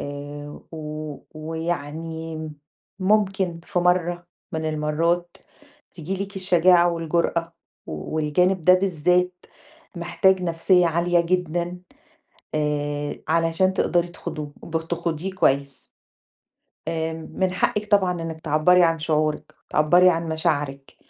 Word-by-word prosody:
آآ، 145 +1 -7
و - - -7
و 155 -1 -6
ويعني 160 0 -4 0.5
ممكن 190 -3 +1
في 180 - -2
مرة 175 -1 +1 0.3
من 160 0 -3
المرات 165 +3 0 0.6
تيجي 190 +4 -3
لِك 200 0 -12
الشجاعة 180 -2 +4
والجرأة، 170 0 -1 0.3
والجانب 155 - 0
ده 180 +3 +7
بالذات، 180 0 +1 0.5
محتاج 175 +2 +2
نفسية 175 +1 +3
عالية 170 +1 +2
جدًا 175 0 -1 0.8
آآ، 145 -1 -1
علشان 165 +3 +2
تقدري 175 -2 +1
تخوضوه 155 -4 -7
ب 165 0 -2
تخوضيه 170 +2 -3
كويس، 140 -6 0 1.0
آمم 160 0 -3
مِن 190 -1 0
حقِك 210 +3 -1
طبعًا 185 -4 +3
إنِك 160 -1 -6
تعبّري 160 +4 +4
عن 165 -1 +2
شعورِك، 155 -1 -1
تعبّري 175 +4 +5
عن 165 -1 -1
مشاعرِك، 145 -4 -2
165 Hz, 110 wpm, -23 LUFS, 155-180 Hz, 1.0 s, ده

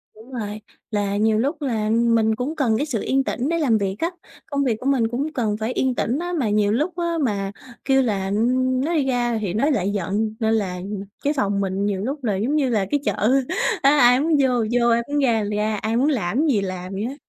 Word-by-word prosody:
Đúng 225 +5 -15
rồi, 215 -3 -5 0.3
là 205 -1 -1
nhiều 215 +1 +2
lúc 290 +6 -1
là 225 -6 -1
mình 225 -1 +2
cũng 255 +7 -3
cần 235 -7 +1
cái 290 - 0
sự 245 -9 -2
yên 270 +1 +1
tĩnh 265 +2 -2
để 335 - +1
làm 240 -8 +3
việc 195 -2 -2
á, 335 - 0 0.4
công 280 -1 -1
việc 235 -5 0
của - - -9
mình 265 -5 +2
cũng 275 +7 -3
cần 215 -4 -1
phải 220 +3 -2
yên 260 -1 0
tĩnh 245 +5 -1
á, 350 +1 -3
mà 230 -6 0
nhiều 205 0 +2
lúc 310 +10 -1
á 340 -1 -1
mà 200 -5 -1 0.3
kêu 270 -1 +4
là, 205 -6 -1
ưm, 255 +5 +1
nói 335 +2 0
đi 290 -4 +2
ra 240 -3 0
thì 195 -4 -2
nó 255 +8 +1
lại 200 -10 +1
giận 205 +3 -2
nên 220 0 +1
là 190 -5 -1 0.5
cái 290 +2 +1
phòng 200 -6 0
mình 195 +1 -1
nhiều 200 -2 -1
lúc 270 +6 -4
là 210 -5 0
giống 235 +10 0
như 275 -4 +2
là 215 -5 +1
cái 290 - +2
chợ 260 +1 +2 0.4
á 275 - +5
ai 245 +1 +6
muốn 310 +1 +2
vô 265 - +3 0.2
vô, 240 -1 +3
ai 235 0 +3
muốn 290 - 0
ra 230 -6 +2
thì 210 - -1
ra, 215 +1 0
ai 220 +2 -1
muốn 275 +5 +3
làm 220 -5 -1
cái 315 - +2
gì 225 -9 +2
làm 185 0 -5
vậy 195 - -3
á. 260 +5 -4
235 Hz, 255 wpm, -22 LUFS, 210-270 Hz, 0.5 s, ai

